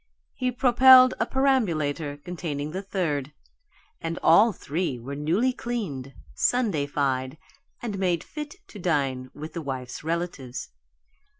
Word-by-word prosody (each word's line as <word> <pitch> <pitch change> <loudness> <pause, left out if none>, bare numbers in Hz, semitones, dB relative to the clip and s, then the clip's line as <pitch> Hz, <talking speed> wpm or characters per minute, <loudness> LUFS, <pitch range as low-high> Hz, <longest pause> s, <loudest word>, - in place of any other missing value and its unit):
He 255 -1 -1
propelled 255 +1 +7
a - - +1
perambulator 165 - +1
containing 155 -2 -5
the 190 +3 -4
third 150 -8 -2 0.7
and 165 +1 -3
all 210 +8 +6
three 160 -5 -3
were 130 +4 -7
newly 175 - +1
cleaned, 170 - -4 0.2
Sundayfied, 145 - 0 0.5
and 210 -5 -3
made 175 -4 +1
fit 300 0 -7
to 210 - -10
dine 135 -7 0
with 155 +2 -8
the 170 - -4
wife's 130 -3 -5
relatives. 160 -6 -4
165 Hz, 120 wpm, -26 LUFS, 140-220 Hz, 0.7 s, propelled